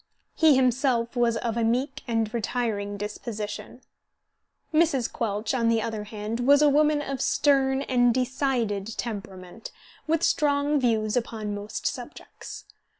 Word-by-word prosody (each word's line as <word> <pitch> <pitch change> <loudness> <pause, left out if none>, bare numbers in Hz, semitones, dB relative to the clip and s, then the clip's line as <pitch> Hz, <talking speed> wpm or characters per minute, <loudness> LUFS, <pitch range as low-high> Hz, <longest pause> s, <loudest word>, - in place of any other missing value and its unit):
He 315 -3 +5
himself 250 -2 +1
was 235 -1 +2
of 230 0 -2
a 230 - +1
meek 260 +5 0
and 225 -2 -1
retiring 215 -3 -2
disposition. 210 +2 -6 0.9
Mrs. 305 -6 +2
Quelch, 210 0 -2
on 230 -3 +2
the 230 -1 +3
other 220 -1 -4
hand, 215 +2 -5
was 285 +4 +5
a 295 - +6
woman 300 0 +3
of 275 -2 -4
stern 270 -1 +2
and 245 -2 +3
decided 240 -5 -1
temperament, 200 -3 -6 0.4
with 325 +1 +1
strong 290 0 +2
views 220 -4 +1
upon 220 -3 -2
most 205 +1 -6
subjects. - - -6
235 Hz, 135 wpm, -26 LUFS, 215-270 Hz, 0.9 s, a